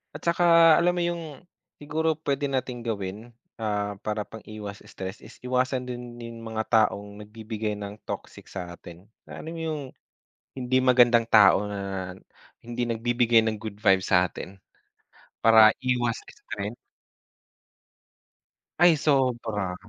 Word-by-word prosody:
At - - -9
saka 170 -1 +6
alam 175 +1 +2
mo 175 - -1
yung 170 -1 -2 0.6
siguro 160 +2 0
pwede 140 0 0
nating 130 -2 -3
gawin, 105 +2 -4 0.3
ah, 105 -2 -2
para 105 0 -1
pang-iwas 105 -1 -9
stress 95 +2 -7
is - - -14
iwasan 125 0 0
din 120 -1 -7
yung 115 0 -8
mga 110 0 -2 0.2
taong 100 0 -9
nagbibigay 110 0 -5
ng 105 0 -7
toxic - - -7
sa 90 -2 -7
atin. 85 0 -12 0.2
Alam 160 - -8
mo - - -5
yung 155 -2 -3 0.8
hindi 130 0 +1
magandang 120 -2 +5
tao 105 -2 +6
na 95 -2 -4 0.5
hindi 120 +1 -4
nagbibigay 120 0 +3
ng 110 -1 -1
good 110 -1 -7
vibe 95 -3 +4
sa'tin. 95 +1 0 0.9
Para 110 -1 +8
iwas 120 -2 0
stress. 100 +3 -7 2.0
Ay 175 -2 +7
sobra. 120 -10 0
115 Hz, 125 wpm, -26 LUFS, 105-130 Hz, 2.0 s, Para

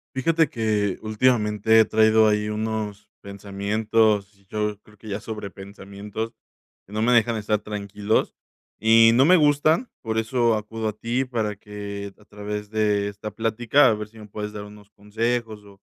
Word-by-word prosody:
Fíjate 160 +2 +2
que, 105 -4 -1
últimamente 110 -1 +2
he - - +6
traído 110 0 +4
ahí 105 0 0
unos 105 -1 -4
pensamientos, 100 +1 0 0.2
yo 105 0 -3
creo 105 0 -21
que 110 +2 -12
ya 100 0 -3
sobrepensamientos 100 +1 -7 0.6
que 100 - -14
no 110 - -1
me 120 +2 +3
dejan 120 -1 +3
estar 105 -1 -1
tranquilos 105 0 -2 0.5
y 115 0 +6
no 130 +3 +5
me 180 +4 +6
gustan. 155 - +3
Por 110 -1 -3
eso 115 0 +1
acudo 110 +1 -4
a 105 - -2
ti, 120 +4 -1
para 110 -5 -3
que 100 -1 -7
a 105 - -21
través 105 0 -6
de 105 -2 +1
esta 105 +1 -7
plática, 115 +6 +2
a - - +3
ver 105 0 -5
si 110 +1 -20
me 105 -1 -11
puedes 105 +1 -6
dar 105 -1 -6
unos 105 0 -14
consejos, 110 +1 -3
o 100 -1 -18
105 Hz, 165 wpm, -23 LUFS, 105-115 Hz, 0.6 s, he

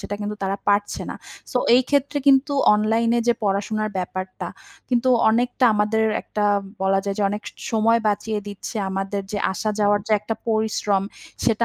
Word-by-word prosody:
সেটা 205 - -5
কিন্তু 210 0 -4
তারা 195 +1 -1
পারছে 205 0 +1
না। - - -5 0.4
সো 250 - +2 0.2
এই 255 - +5
ক্ষেত্রে 285 0 +1
কিন্তু 275 +1 +5 0.2
অনলাইনে 225 +2 +2
যে - - +6
পড়াশোনার 210 +2 -1
ব্যাপারটা 185 +1 -5 0.4
কিন্তু 250 0 +1 0.2
অনেকটা 245 +3 +1
আমাদের 210 +1 +1 0.2
একটা 210 - -2 0.4
বলা 195 0 +3
যায় 200 -1 -2
যে - - +1
অনেক 210 +1 -4
স - - -12 0.2
সময় 225 +1 +3
বাঁচিয়ে 210 +1 -1
দিচ্ছে। 205 +3 -7
আমাদের 195 +1 -2
যে 205 - -1
আসা 215 +3 -2
যাওয়ার 205 0 +3
যে 220 - 0
একটা 220 +2 -3
পরিশ্রম 215 -3 +1 0.4
সেটা 230 0 +2
215 Hz, 170 wpm, -22 LUFS, 205-230 Hz, 0.4 s, যে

